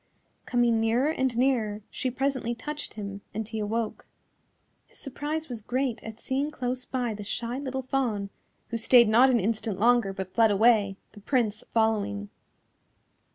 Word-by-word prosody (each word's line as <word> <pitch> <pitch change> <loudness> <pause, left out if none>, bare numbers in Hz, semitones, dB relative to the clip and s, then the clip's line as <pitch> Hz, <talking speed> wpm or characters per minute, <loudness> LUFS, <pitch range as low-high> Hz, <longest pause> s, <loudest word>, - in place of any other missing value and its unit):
Coming 240 -2 +3
nearer 240 +7 +2
and 260 -6 0
nearer 225 -5 +1
she 260 - -2
presently 260 -2 -1
touched 295 +6 -6
him 200 -1 -6
and 220 -1 -3
he 220 0 -4
awoke. 220 +2 -3 0.8
His - - -11
surprise 300 +3 -3
was 240 -3 -5
great 250 +2 -2
at 225 0 -8
seeing 275 +4 -1
close 255 -3 -2
by 245 -3 -2
the 210 0 -7
shy 235 +5 -3
little 265 -1 -3
Fawn, 235 -7 -1 0.4
who 230 - -2
stayed 235 +1 +6
not 240 +5 +6
an 245 -2 +3
instant 215 -1 -1
longer 235 -2 +4
but 190 -1 -6
fled 225 -1 +5
away, 205 -2 +4
the 210 - -13
Prince 215 -2 0
following. 205 - 0
235 Hz, 155 wpm, -27 LUFS, 215-260 Hz, 0.8 s, stayed